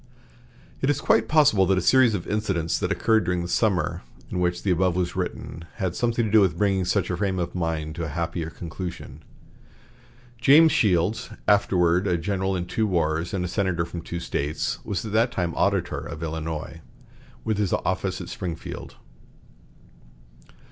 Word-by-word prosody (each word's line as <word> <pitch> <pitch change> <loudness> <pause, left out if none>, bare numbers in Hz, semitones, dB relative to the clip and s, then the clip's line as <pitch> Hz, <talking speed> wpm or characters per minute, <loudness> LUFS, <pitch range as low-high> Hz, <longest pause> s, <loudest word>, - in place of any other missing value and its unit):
It 135 - +1
is 145 - +1
quite - - +3
possible 135 - +4
that 95 0 +3
a 95 - 0
series 130 -2 +5
of 90 - -4
incidents 95 -6 -1
that 90 - -1
occurred 110 +1 +2
during 90 0 -1
the - - -4
summer 95 0 0 0.3
in 90 - -2
which 90 0 0
the 100 - +1
above 90 0 +2
was 90 -1 -1
written 90 -2 -4
had 95 -4 -2
something 120 +1 0
to 105 - -3
do 110 -1 +6
with 90 -4 +2
bringing 95 -1 +1
such 95 -1 0
a 90 - -2
frame 95 -2 -1
of 85 -1 -2
mind 80 -3 -2
to 85 - -2
a 75 -1 -6
happier 85 -1 -2
conclusion. 85 +1 -7 1.2
James 150 +6 +7
Shields, 105 - +1 0.2
afterward 95 -3 +3
a 90 -2 +2
general 95 +2 -1
in 90 -1 -2
two 110 +4 -1
wars 85 -2 0
and 90 -2 -1
a - - -2
senator 90 -3 0
from 85 0 -7
two 85 +1 -5
States, 75 -2 -2
was 100 0 -3
at 105 - -5
that 115 +3 +2
time 85 -2 -2
auditor - - 0
of 75 - -7
Illinois, 80 0 -5 0.6
with 110 -2 -1
his 100 -4 0
office - - -1
at - - -7
Springfield. 85 -3 -6
90 Hz, 175 wpm, -25 LUFS, 85-105 Hz, 1.2 s, James